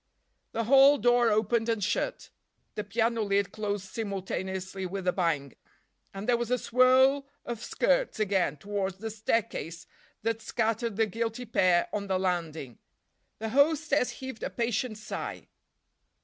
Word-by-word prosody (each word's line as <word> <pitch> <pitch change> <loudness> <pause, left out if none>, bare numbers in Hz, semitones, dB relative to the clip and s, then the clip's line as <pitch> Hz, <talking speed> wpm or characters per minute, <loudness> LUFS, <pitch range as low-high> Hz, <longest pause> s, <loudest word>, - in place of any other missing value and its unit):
The 230 - 0
hall 275 +4 +7
door 240 +1 +4
opened 225 +2 +1
and 225 -3 0
shut, 210 - -2 0.4
the 210 - -3
piano 225 +3 0
lid 200 -2 +1
closed 205 -2 -3
simultaneously 190 -3 -4
with 190 0 -5
a 180 - +3
bang, 155 -7 -1 0.6
and 195 +2 -7
there 245 -1 +4
was 235 -1 -3
a 250 - +2
swirl 260 +3 +4 0.2
of 235 -2 -5
skirts - - +1
again 190 -6 +1
towards 195 +2 -3
the 220 +2 -5
staircase 210 -6 -2 0.4
that 225 0 -1
scattered 225 0 -1
the 225 +2 +3
guilty 230 +3 -3
pair 185 -6 +3
on 205 -1 -2
the 190 -1 +1
landing. 165 - -3 0.6
The 220 0 -4
hostess 285 +1 +3
heaved 260 -4 -7
a - - -2
patient 235 -1 -2
sigh. 215 0 -6
220 Hz, 145 wpm, -28 LUFS, 190-240 Hz, 0.6 s, hall